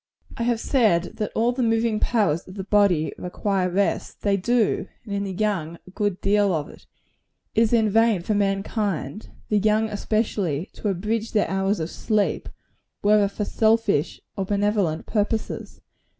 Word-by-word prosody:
I -, -, -6 dB
have 235 Hz, -1 st, +1 dB
said 215 Hz, -11 st, +1 dB
that 210 Hz, -, -2 dB
all 230 Hz, +2 st, +2 dB
the 250 Hz, +1 st, -3 dB
moving 225 Hz, -1 st, +1 dB
powers 200 Hz, -10 st, +1 dB
of 185 Hz, -, -11 dB
the 195 Hz, -, -4 dB
body 195 Hz, -6 st, +2 dB
require 185 Hz, +1 st, -1 dB
rest. 195 Hz, +3 st, -1 dB
They 200 Hz, -1 st, +3 dB
do; 225 Hz, +3 st, +1 dB, 0.2 s
and 205 Hz, -, -5 dB
in 200 Hz, 0 st, -1 dB
the 195 Hz, -, -4 dB
young, 185 Hz, -5 st, -1 dB
a 185 Hz, -, -14 dB
good 205 Hz, -2 st, -1 dB
deal 200 Hz, -2 st, +3 dB
of 150 Hz, -1 st, -3 dB
it. -, -, -16 dB, 0.7 s
It 225 Hz, -, +3 dB
is 225 Hz, -, +3 dB
in 225 Hz, -2 st, +4 dB
vain 220 Hz, -3 st, +3 dB
for 215 Hz, -, 0 dB
mankind 200 Hz, 0 st, -1 dB, 0.2 s
the 210 Hz, -, +3 dB
young 215 Hz, +1 st, +2 dB
especially 205 Hz, -6 st, -1 dB
to -, -, -5 dB
abridge 210 Hz, +4 st, -2 dB
their 210 Hz, -, +2 dB
hours 195 Hz, +1 st, 0 dB
of 160 Hz, +1 st, -3 dB
sleep, 215 Hz, -3 st, -1 dB, 0.5 s
whether 205 Hz, 0 st, +5 dB
for 205 Hz, +1 st, -4 dB
selfish 220 Hz, -9 st, +1 dB, 0.2 s
or 195 Hz, -, -1 dB
benevolent 200 Hz, -5 st, 0 dB
purposes. 215 Hz, +1 st, -2 dB
205 Hz, 165 wpm, -24 LUFS, 190-220 Hz, 0.7 s, whether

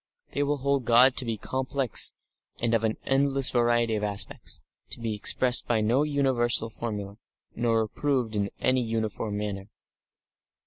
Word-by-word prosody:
They -, -, -2 dB
will 145 Hz, +1 st, 0 dB
hold 140 Hz, 0 st, 0 dB
God 125 Hz, +3 st, +5 dB
to 130 Hz, -, +1 dB
be 115 Hz, -2 st, -2 dB
complex 130 Hz, +1 st, +1 dB, 0.5 s
and 120 Hz, -1 st, 0 dB
of 115 Hz, -1 st, +2 dB
an 110 Hz, -1 st, 0 dB
endless 135 Hz, -1 st, +2 dB
variety 120 Hz, -1 st, +2 dB
of 105 Hz, -1 st, -2 dB
aspects, 100 Hz, -1 st, -2 dB, 0.3 s
to -, -, -5 dB
be 115 Hz, -2 st, -3 dB
expressed 125 Hz, +4 st, +2 dB
by 115 Hz, -2 st, +1 dB
no 115 Hz, +6 st, +2 dB
universal 130 Hz, -6 st, +1 dB
formula 105 Hz, -3 st, -6 dB, 0.4 s
nor 115 Hz, -1 st, +1 dB
approved 125 Hz, 0 st, -2 dB
in 100 Hz, -1 st, -1 dB
any 130 Hz, 0 st, +2 dB
uniform 110 Hz, -2 st, -3 dB
manner. 100 Hz, -1 st, -5 dB
120 Hz, 150 wpm, -26 LUFS, 110-130 Hz, 0.5 s, God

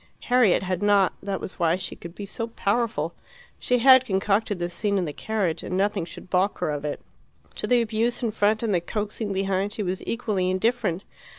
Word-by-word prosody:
Harriet 245 Hz, -8 st, +4 dB
had 185 Hz, 0 st, -2 dB
not; 205 Hz, -2 st, +4 dB
that 195 Hz, -1 st, -3 dB
was 185 Hz, -, -8 dB
why 165 Hz, -1 st, +3 dB
she 185 Hz, -, -5 dB
could 170 Hz, +1 st, -10 dB
be 205 Hz, -, -6 dB
so 230 Hz, +3 st, -4 dB
powerful. 210 Hz, -7 st, -1 dB, 0.5 s
She 250 Hz, -, +1 dB
had 260 Hz, +1 st, +7 dB
concocted 205 Hz, -1 st, 0 dB
this 175 Hz, 0 st, -3 dB
scene 200 Hz, +3 st, 0 dB
in 185 Hz, -, 0 dB
the 150 Hz, -, -4 dB
carriage, 200 Hz, -5 st, -1 dB
and 185 Hz, -, -3 dB
nothing 195 Hz, -2 st, +1 dB
should 175 Hz, -, -11 dB
baulk 185 Hz, +2 st, +1 dB
her 175 Hz, -4 st, -1 dB
of 145 Hz, -1 st, -4 dB
it. 150 Hz, -1 st, -3 dB, 0.6 s
To -, -, -3 dB
the 245 Hz, -1 st, +4 dB
abuse 230 Hz, +3 st, -1 dB
in 230 Hz, -, +1 dB
front 215 Hz, +1 st, +1 dB
and 220 Hz, -3 st, +1 dB
the 175 Hz, -, +2 dB
coaxing 210 Hz, +3 st, -3 dB
behind 195 Hz, +1 st, -1 dB
she 215 Hz, -, -3 dB
was 185 Hz, 0 st, -2 dB
equally 210 Hz, -6 st, -1 dB
indifferent. 200 Hz, -1 st, 0 dB
200 Hz, 205 wpm, -25 LUFS, 185-220 Hz, 0.6 s, had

